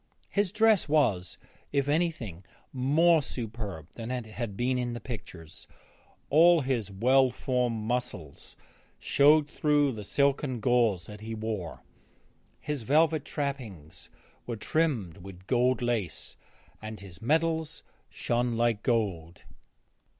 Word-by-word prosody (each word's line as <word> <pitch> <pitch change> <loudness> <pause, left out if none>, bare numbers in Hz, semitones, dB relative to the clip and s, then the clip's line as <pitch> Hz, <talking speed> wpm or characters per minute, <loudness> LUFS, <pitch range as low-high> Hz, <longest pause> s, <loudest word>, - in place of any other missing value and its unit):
His 200 -2 +1
dress 220 -5 +3
was, 95 -12 +1 0.3
if 140 -1 +1
anything, 145 - -1 0.3
more 155 +6 +4
superb 110 - -6
than 115 0 -7
it 125 -2 -3
had 110 -2 -6
been 125 +1 0
in 120 -1 -2
the 120 - -5
pictures; 90 - -9 0.6
all 165 +2 +6
his 125 -6 -1
well 130 +6 +4
formed 125 -3 -1
muscles 110 - -4 0.4
showed 150 +1 +4
through 145 -1 +2
the 110 -4 -7
silken 140 +2 +1
gauze 115 -7 +2
that 105 +2 -10
he 110 +1 -5
wore. 110 -6 -5 0.8
His 150 -3 -3
velvet 155 +4 +3
trappings 120 - -5 0.4
were 120 - -3
trimmed 120 - -1
with 95 0 -12
gold 125 +2 +2
lace 115 -7 -2 0.5
and 110 0 -7
his 95 -3 -12
medals 160 +4 0 0.3
shone 120 -1 -1
like 115 -3 +1
gold. 95 -9 -1
120 Hz, 120 wpm, -28 LUFS, 105-145 Hz, 0.8 s, all